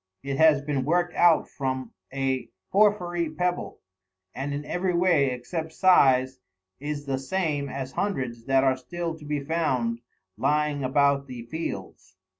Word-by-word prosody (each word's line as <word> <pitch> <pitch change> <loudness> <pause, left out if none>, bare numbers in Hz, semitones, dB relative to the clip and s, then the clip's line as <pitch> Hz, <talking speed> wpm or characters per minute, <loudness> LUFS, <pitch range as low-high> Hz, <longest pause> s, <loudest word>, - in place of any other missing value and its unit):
It 135 0 -3
has 155 -3 +5
been 140 -2 -1
worked 175 +4 +1
out 175 -2 +4
from 130 -3 -4 0.2
a 135 -1 -1 0.2
porphyry 180 -5 +2
pebble, 175 +3 -2 0.5
and 135 +2 -4
in 145 +1 -4
every 180 +2 -1
way, 170 -5 +3
except 160 +6 -5
size, 130 -9 +4 0.4
is 145 0 -4
the 135 -1 -1
same 145 -1 -1
as 135 -1 -5
hundreds 125 - -3
that 135 0 +3
are 130 -1 +3
still 165 +5 -4
to 150 - -12
be 145 -1 -2
found 130 -7 0 0.4
lying 150 +2 +1
about 140 +1 +2
the 125 -3 -7
fields. 95 - -6
145 Hz, 145 wpm, -26 LUFS, 130-165 Hz, 0.5 s, has